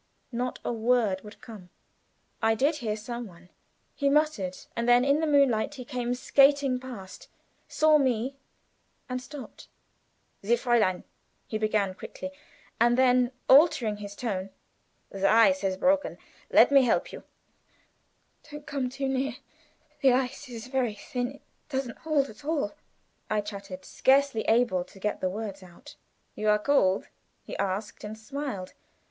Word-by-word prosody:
Not 250 +1 -3
a - - -1
word 225 -4 +1
would 210 +1 -13
come. 205 -6 -11 0.7
"I 225 0 +3
did 285 +7 +1
hear 220 -6 -3
some 235 +2 -6
one," 175 -1 -17 0.4
he 280 -1 +1
muttered, 280 -12 +1 0.2
and 235 +1 -1
then 245 +1 +5
in 280 +2 +3
the 320 - 0
moonlight 280 -3 +3
he 255 -3 -8
came 245 -2 -2
skating 275 0 +3
past, 235 -8 -10 0.4
saw 310 -1 +4
me, 260 0 0 0.7
and 255 0 -3
stopped. 280 +1 -10 0.7
"Sie, 225 +4 +2
Fräulein!" 235 -7 +1 0.4
he 215 - -4
began, 215 -3 +1
quickly, 280 +8 -8 0.5
and 240 +1 +4
then 250 -1 +4 0.2
altering 260 -7 +5
his 205 -1 -8
tone. 195 -5 -3 0.6
"The 195 0 0
ice 230 +6 +5
has 190 -1 -1
broken. 285 +6 +1 0.3
Let - - +6
me 275 -1 +7
help 250 - +1
you." - - -9 1.3
"Don't 295 0 -9
come 270 -3 -2
too 270 +1 -3
near; 265 -1 -1 0.7
the 265 -3 +5
ice 260 +1 -2
is 235 -1 -7
very 255 -4 -1
thin 245 +4 -4
it 280 - -16 0.3
doesn't 265 -4 -3
hold 300 -3 +1
at 220 +4 -14
all," 285 -9 -1 0.6
I 215 -1 +1
chattered, 195 -2 -8
scarcely 270 -3 +2
able 225 -6 +3
to 195 - -17
get 210 +2 -2
the 185 - +1
words 200 0 -6
out. 185 +11 -14 0.4
"You 215 0 -1
are 210 - +5
cold?" 210 -5 +2 0.4
he - - -8
asked, 200 +2 -3
and 215 +1 -6
smiled. 220 -5 -6
240 Hz, 150 wpm, -27 LUFS, 210-275 Hz, 1.3 s, me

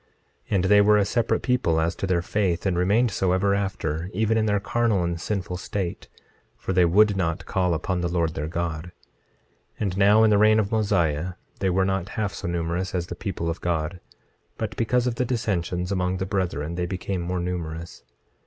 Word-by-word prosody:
And 95 -4 +2
they 105 +2 +6
were 105 +1 +5
a 100 - +3
separate 115 +2 0
people 120 -11 +1
as 80 +1 0
to 95 - -2
their 85 -2 +1
faith, 95 -3 0
and 95 -2 +1
remained 105 +7 +2
so 95 -2 +1
ever 100 +2 +2
after, 90 -4 -2
even 110 +2 +2
in 110 -1 +2
their 105 -1 +2
carnal 110 -2 +1
and 85 -1 -2
sinful 90 -3 -3
state; 90 -1 -4 0.5
for 95 - -3
they 90 -1 +5
would 100 +4 +4
not 85 -3 -1
call 90 -2 +1
upon 90 +3 -2
the 85 - 0
Lord 85 -2 0
their 75 - -3
God. 85 -1 -3 0.9
26:5 - - -11
And 95 -3 -1
now 105 +3 +5
in 110 - +5
the 105 - +4
reign 110 +1 +5
of 105 -1 -1
Mosiah 90 -6 +1 0.3
they 95 - +1
were 95 +1 +2
not 95 0 -1
half 105 -3 -1
so - - -5
numerous 85 +2 -2
as 85 -1 -1
the 85 - -7
people 85 -2 -4
of 85 +1 -3
God; 85 +1 -2 0.6
but - - -4
because 125 +2 +1
of 125 - 0
the - - +1
dissensions 90 -7 -2
among 90 -1 0
the 95 - -2
brethren 85 -6 -2
they 90 0 -2
became 95 0 -3
more 90 +1 -2
numerous. 85 -2 -5
95 Hz, 205 wpm, -25 LUFS, 85-105 Hz, 0.9 s, they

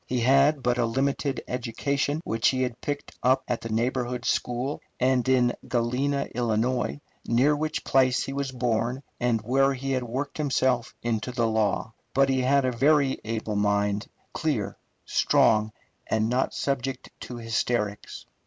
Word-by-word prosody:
He 125 -1 -1
had 135 +3 +4
but 125 0 +1
a 120 - +3
limited 135 +3 -1
education, 140 +5 -1
which 115 -6 +1
he 130 -1 +2
had 125 -2 -4
picked 145 0 -4
up 130 +2 +3
at 120 - -2
the 115 - -6
neighbourhood 125 +2 -1
school 125 +4 -1 0.2
and 130 0 +2
in 125 -2 +4
Galena, 130 +4 0
Ill., 120 - 0 0.3
near 130 +6 +3
which 155 +1 -2
place 130 -1 +3
he 135 - -5
was 140 -1 -2
born 120 +1 -1 0.2
and 120 -3 +1
where 135 +3 +2
he 135 +1 -4
had 130 -1 +1
worked 130 +5 -4
himself 130 -4 +1
into 115 +1 -1
the 120 -1 0
law; 110 0 0 0.2
but 135 0 +4
he 130 -1 +2
had 135 +1 +3
a 130 - +1
very 140 +2 +2
able 110 -1 -3
mind, 105 +1 +1 0.3
clear, 145 -11 -1 0.3
strong, 110 0 +3 0.4
and 110 0 +1
not 125 +3 0
subject 135 -1 -2
to 125 - -7
hysterics. 115 -2 -2
125 Hz, 155 wpm, -26 LUFS, 115-135 Hz, 0.4 s, had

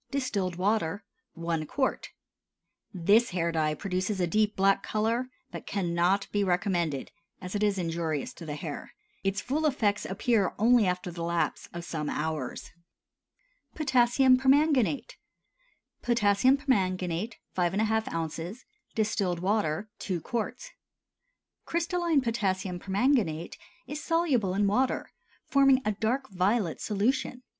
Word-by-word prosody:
Distilled 210 -10 -1
water 200 0 0 0.3
1 165 -2 -2
qt. 265 -2 -1 0.8
This 205 +6 +3
hair 170 -2 -1
dye 155 -2 0
produces 185 +3 -2
a 180 - +2
deep 215 +4 +1
black 195 0 +3
color, 230 +4 -1 0.2
but - - -8
cannot 180 +1 +1
be 205 -1 +1
recommended, 175 -6 0 0.3
as 185 -1 -7
it 205 - -1
is 205 -2 +2
injurious 165 -4 -2
to 170 - -10
the 150 - -3
hair. 150 -1 -7 0.3
Its 195 +1 0
full 290 +5 -1
effects 210 -7 0
appear 205 0 +1
only 230 -1 +5
after 180 0 -2
the 170 0 -7
lapse 170 0 -1
of 175 0 -7
some 155 -3 -3
hours. 155 -4 -3 1.0
POTASSIUM 260 -2 +4
PERMANGANATE. 280 - +2 0.8
Potassium 235 +2 +3
permanganate 190 - 0 0.2
5½ 215 +5 +1
oz. 165 +7 -4 0.3
Distilled 210 -5 0
water 195 -1 0
2 185 -3 -2
qts. 235 - -4 1.0
Crystalline 340 -2 +1
potassium 195 -6 -1
permanganate 195 - 0 0.3
is 295 +3 -6
soluble 275 - +1
in 205 +1 +2
water, 255 +6 +1 0.3
forming 275 -1 +5
a 215 - +2
dark 235 +6 -1
violet 190 -1 0
solution. 250 +4 -1
200 Hz, 120 wpm, -28 LUFS, 175-245 Hz, 1.0 s, only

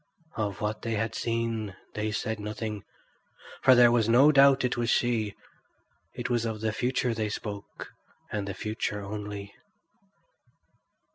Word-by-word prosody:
Of 105 -3 -3
what 105 +1 -2
they 115 -1 -2
had 110 +2 -1
seen 115 -3 -2 0.2
they 110 0 -2
said 110 +1 -2
nothing, 105 0 -5 0.8
for 130 -1 +7
there 120 -1 +7
was 115 -2 +2
no 135 +6 +7
doubt 135 -2 +6
it 125 - 0
was 120 0 -1
she; 115 -5 +1 0.8
it - - -3
was 120 -2 +1
of 110 -2 -3
the 110 -1 0
future 125 +1 0
they 110 -1 -2
spoke, 100 -1 -7 0.4
and 105 -2 -2
the 100 - -4
future 105 0 -3
only. 100 0 -6
110 Hz, 145 wpm, -28 LUFS, 105-120 Hz, 0.8 s, for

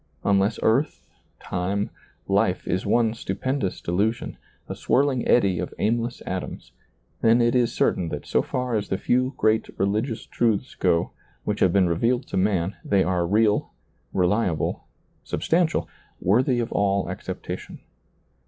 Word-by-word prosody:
Unless 100 +2 +2
earth, 130 +7 +1 0.3
time, 95 +3 -2 0.4
life, - - +1
is 90 +1 -1
one 115 -2 +3
stupendous 115 +1 -2
delusion, 105 +6 -1 0.3
a - - -4
swirling 135 -2 +1
eddy 95 -7 +3
of - - -5
aimless 115 +3 -1
atoms, 95 0 -5 0.5
then 115 +1 +5
it 120 0 +3
is 120 -2 +2
certain 85 -6 +1
that - - -5
so - - +2
far 125 -2 -2
as 105 -1 -2
the 95 - 0
few 125 +6 +1
great 110 +1 +2
religious 110 +5 -1
truths 115 -4 0
go, 85 0 +1 0.3
which - - -2
have 95 - +4
been 95 0 +3
revealed 115 +10 +1
to - - -4
man, 95 -1 +1
they 100 -2 +2
are 90 -2 0
real, 105 +2 +2 0.4
reliable, 90 -2 0 0.4
substantial, 165 -1 0 0.3
worthy 120 +6 +2
of 115 - -2
all 100 -1 +1
acceptation. - - -6
105 Hz, 140 wpm, -24 LUFS, 95-120 Hz, 0.5 s, then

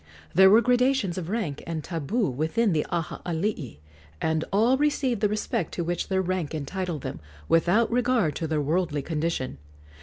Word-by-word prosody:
There 190 +2 +7
were 215 +4 +7
gradations 250 -6 +2
of 170 -1 -6
rank 195 -10 -2
and 160 -2 -3
tabu 185 - -1
within 160 - +1
the 150 - +1
Aha 170 -2 -3
alii, 165 - -2 0.4
and 160 0 0
all 225 +6 +4
received 270 -5 0
the 210 - +3
respect 210 -3 -2
to 175 - -1
which 175 +1 -2
their 190 -1 +1
rank 180 -4 -2
entitled 160 +1 -4
them, - - -5 0.3
without 180 +8 +3
regard 240 - +2
to 160 - -2
their 155 -1 0
worldly 155 -1 0
condition. 155 - -2
180 Hz, 170 wpm, -26 LUFS, 160-225 Hz, 0.4 s, There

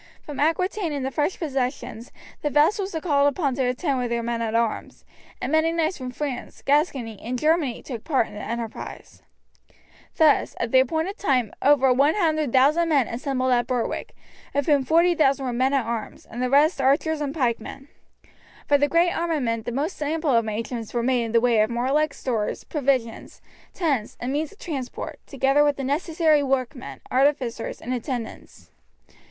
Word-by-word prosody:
From 295 - -7
Aquitaine 335 +3 0
and 280 -2 -3
the 265 - -2
French 295 +6 -1
possessions 255 -5 -3 0.3
the 295 - 0
vassals 335 +6 +2
were 320 - -2
called 285 -4 +3
upon 285 -1 0
to 265 +1 -1
attend 255 +2 0
with 245 -1 -2
their 235 0 -1
men 235 0 -2
at 225 -1 -2
arms, 230 -1 -2 0.3
and - - -3
many 315 +1 +3
knights 330 0 -1
from 255 -1 -5
France, 260 -1 -5
Gascony, 275 - +1
and 250 +2 -3
Germany 305 -3 +1
took 240 -5 -7
part 270 -8 +1
in - - -13
the 205 - -7
enterprise. 230 +1 -6 1.0
Thus, 310 -3 +3
at 230 -1 -2
the 260 - +6
appointed 320 - -1
time 255 - +1
over 270 -2 +5
100,000 305 - +3
men 275 -7 +3
assembled 260 +1 -1
at 240 -1 +2
Berwick, 250 -3 -3 0.4
of 285 -1 +1
whom 290 -3 +3
40,000 315 -4 +3
were 250 - -2
men 260 +3 +1
at 270 -4 +1
arms, 230 -1 -5
and 240 - -7
the 255 - 0
rest 285 +2 +4
archers 295 +4 +2
and 285 -2 -2
pikemen. 260 -1 -2 0.8
For 285 -1 +4
the 290 0 +2
great 340 +2 +3
armament 265 -10 -1
the - - -3
most 295 +8 -3
ample 300 -2 0
arrangements 230 +1 -2
were 235 - +1
made 245 -1 +1
in 225 - -5
the 230 - +4
way 235 -2 +3
of 215 - +2
warlike 270 +6 0
stores, 225 -5 -2
provisions, 265 -6 -2 0.3
tents, 280 - -1
and 250 +2 -3
means 300 +1 -2
of 410 - -18
transport, 275 -10 -6
together 275 +1 +2
with 290 -1 +2
the 275 - -4
necessary 310 +2 +2
workmen, 265 -1 -3
artificers, 260 -3 0
and 250 - -4
attendants. 245 -1 -6
270 Hz, 175 wpm, -24 LUFS, 245-305 Hz, 1.0 s, the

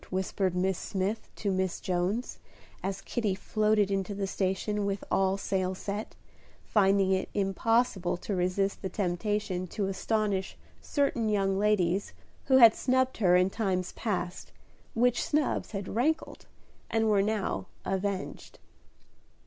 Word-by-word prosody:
whispered 190 0 -1
Miss 185 0 0
Smith 200 +3 -2
to 200 - -1
Miss 185 -1 -1
Jones, 185 +7 -2 0.4
as 195 0 -3
Kitty 215 -6 -1
floated 210 0 +1
into 195 +1 -1
the 200 0 -1
station 195 +2 -1
with 200 -1 -2
all 195 0 +2
sail 190 -1 -1
set, 205 +3 -5 0.5
finding 195 -2 +3
it 190 0 0
impossible 200 -1 +1
to 200 - -4
resist 185 +2 0
the 190 - -3
temptation 185 0 -1
to 200 +3 -2
astonish 195 0 -1 0.2
certain 260 -6 0
young 195 -2 +1
ladies 200 - +1 0.3
who 265 -1 +5
had 230 -3 +9
snubbed 260 0 +1
her 180 -5 +4
in 180 +1 +3
times 190 -5 -1
past, 180 -4 -3 0.4
which 245 +1 +3
snubs 300 -1 0
had 195 -2 -5
rankled, 310 +9 -1 0.4
and 225 -1 +1
were 205 -2 +4
now 200 - -1 0.2
avenged. 195 0 -3
195 Hz, 135 wpm, -29 LUFS, 190-215 Hz, 0.5 s, had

